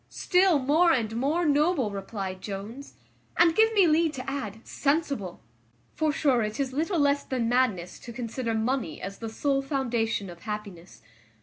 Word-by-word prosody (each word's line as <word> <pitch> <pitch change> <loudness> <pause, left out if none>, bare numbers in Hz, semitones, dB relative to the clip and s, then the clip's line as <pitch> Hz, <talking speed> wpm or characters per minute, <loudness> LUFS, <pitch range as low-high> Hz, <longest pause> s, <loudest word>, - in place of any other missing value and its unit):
"Still 365 -3 +3
more 305 +6 +3
and 225 -6 0
more 295 +8 0
noble," 295 - +2
replied 195 -1 -5
Jones; 215 +7 -7 0.4
"and 335 -1 +5
give 445 +2 +5
me 400 -4 +5
leave 320 -1 +3
to 255 -1 -7
add, 225 -6 -5
sensible: 280 - -1 0.5
for 310 -1 +1
sure 275 -5 +2
it 215 +2 -3
is 265 -2 -1
little 330 +6 0
less 285 -1 +2
than 250 -3 -2
madness 225 -8 0
to 240 - -9
consider 235 -1 -3
money 225 - -1
as 195 +1 -7
the 225 - -5
sole 275 +4 0
foundation 240 -7 -1
of 175 -1 -10
happiness. 200 - -8
255 Hz, 165 wpm, -27 LUFS, 215-295 Hz, 0.5 s, and